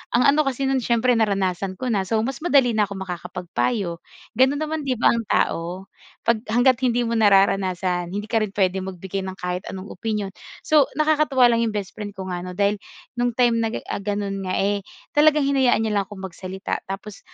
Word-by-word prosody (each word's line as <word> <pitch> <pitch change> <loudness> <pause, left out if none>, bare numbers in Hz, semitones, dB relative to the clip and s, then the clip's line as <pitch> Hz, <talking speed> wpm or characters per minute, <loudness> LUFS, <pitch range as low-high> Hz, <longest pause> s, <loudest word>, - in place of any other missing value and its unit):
ang 245 - +4
ano 300 -1 +2
kasi 270 0 -1
no'n 265 -1 +2
siyempre 235 +1 +2
naranasan 195 -3 0
ko 250 +2 -2
na, 195 -3 0
so, 225 - 0
mas 260 0 -3
madali 275 -8 +4
na 210 -2 +3
ako 200 - -7
makakapagpayo. 180 +1 -3 0.4
Gano'n 265 +2 +4
naman 310 -2 -3
'di 255 - +1
ba 235 - +4
ang 230 -2 -2
tao 180 +1 -1 0.3
pag 235 -1 +2
hangga't 245 +3 +3
hindi 245 -2 +1
mo 230 -1 0
nararanasan 190 -3 +2
hindi 205 +1 -3
ka 225 - +3
rin 210 -2 -2
puwedeng 190 -1 +1
magbigay 190 +2 -5
ng 190 - -6
kahit 180 0 -4
anong 190 +1 -7
opinyon. 210 -1 -3 0.3
So, 300 -3 +4
nakakatuwa 300 -5 +4
lang 230 - +2
'yong 215 - -4
bestfriend 205 +1 -5
ko 190 -1 -6
nga 175 - -3
'no 180 0 -7
dahil 200 +1 +1 0.4
no'ng 245 -1 0
time 240 -2 +3
na 225 - +1
ga - - -2
eh, - - -8
ah, - - -2
gano'n 200 -1 -2
nga, 185 - -3
eh, 200 +1 +1 0.4
talagang 305 0 +6
hinayaan 260 -5 +3
niya 220 - -1
lang 200 - +2
akong 205 -2 -10
magsalita. 190 +1 -5
Tapos, 195 +1 -7
210 Hz, 205 wpm, -23 LUFS, 190-245 Hz, 0.4 s, talagang